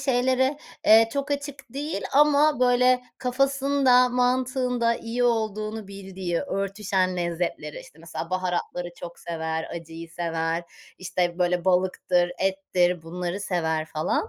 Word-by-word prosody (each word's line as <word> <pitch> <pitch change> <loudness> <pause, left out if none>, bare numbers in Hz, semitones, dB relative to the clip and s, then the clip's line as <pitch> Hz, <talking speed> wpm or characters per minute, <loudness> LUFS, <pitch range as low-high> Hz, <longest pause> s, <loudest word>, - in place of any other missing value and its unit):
şeylere, 260 +1 +2 0.3
eee, 225 +1 +7
çok 280 +1 -2
açık 285 -3 -4
değil 285 -7 -3
ama 295 0 +4
böyle 250 0 +4 0.2
kafasında 270 0 +3
mantığında 250 -1 +1
iyi 235 +1 -2
olduğunu 215 -2 -1
bildiği 190 -3 -4
örtüşen 195 -5 -1
lezzetleri, 170 -3 -3
işte, 155 - -16
mesela 165 +1 -7
baharatları 180 -1 -2
çok 170 -1 -9
sever, 160 -1 -3
acıyı 165 0 -8
sever. 165 0 -2 0.4
İşte, 180 -1 -1
böyle 180 0 +1
balıktır, 180 -1 +2
ettir 180 -3 +1
bunları 180 +3 -4
sever 160 -5 -1
falan. 155 - -1
195 Hz, 120 wpm, -25 LUFS, 175-250 Hz, 0.4 s, eee